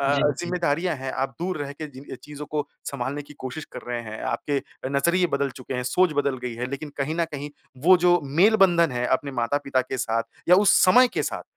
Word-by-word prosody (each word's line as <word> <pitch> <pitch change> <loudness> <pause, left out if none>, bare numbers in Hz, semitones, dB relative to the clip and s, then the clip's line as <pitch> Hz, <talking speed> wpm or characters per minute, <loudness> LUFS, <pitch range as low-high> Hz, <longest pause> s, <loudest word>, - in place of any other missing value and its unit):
अ, 140 0 +2 0.3
ज़िम्मेदारियाँ 175 -1 0
हैं 130 0 -5
आप 135 +1 -1
दूर 180 -1 -2
रह 140 - -5
के 155 +2 -7
जिन 135 -1 -12
अ, - - -5
चीज़ों 150 0 -8
को 150 -1 -2 0.2
संभालने 140 +2 -3
की 145 +1 -15
कोशिश 140 +4 -5
कर - - -7
रहे 120 -1 -2
हैं। 110 -1 -8
आपके 140 -2 -1 0.3
नज़रिए 170 +6 +2
बदल 140 0 -1
चुके 130 - -6
हैं, 125 - -1
सोच 155 +7 +2
बदल 140 -2 -1
गई 125 -2 -3
है। 120 +2 -3
लेक़िन 145 +2 -5
कहीं 140 +3 -1
न 170 - +2
कहीं 145 0 -5 0.4
वो 185 0 +9
जो 175 -1 +5
मेल 180 +11 +4
बंधन 170 -5 +2
है 125 0 -1
अपने 140 - -7
माता-पिता 135 +2 0
के 130 +1 -5
साथ 115 0 0 0.3
या 180 - +8
उस - - +7
समय 250 +8 +6
के - - +1
साथ - - -3
145 Hz, 230 wpm, -24 LUFS, 130-170 Hz, 0.4 s, वो